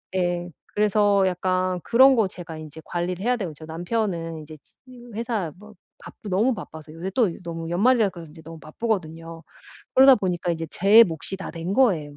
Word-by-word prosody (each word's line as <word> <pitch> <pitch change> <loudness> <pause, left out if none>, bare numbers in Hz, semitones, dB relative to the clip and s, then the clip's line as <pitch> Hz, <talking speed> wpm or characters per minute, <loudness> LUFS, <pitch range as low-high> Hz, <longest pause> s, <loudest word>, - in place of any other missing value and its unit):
예. 175 -1 -1 0.2
그래서 205 -1 +3
약간 185 0 -1
그런 260 +3 +6
거 220 -5 +2
제가 170 -3 -9
인제 155 0 -10
관리를 175 +2 -3
해야 250 +1 +2
되고 190 -7 -4
저 155 - -11
남편은 170 -1 -3
이제 155 +1 -12
치으 245 -2 -16
회사 220 -7 -2
뭐 210 +2 -15 0.3
바쁘 210 - -11
너무 220 +7 +2
바빠서 160 -5 -10
요새 170 +4 -5
또 225 -9 +3
너무 165 -1 -6
연말이라 220 +3 +3
그래서 170 -3 -11
그런지 160 +2 -14
너무 165 0 -10
바쁘거든요. 165 -3 -4 0.5
그러다 265 +1 +8
보니까 180 -5 -2
인제 165 0 -4
제 210 +5 +6
몫이 165 +1 -5
다 195 - -7
된 170 +3 -4
거예요. 170 - +2
180 Hz, 375 characters per minute, -24 LUFS, 165-215 Hz, 0.5 s, 그러다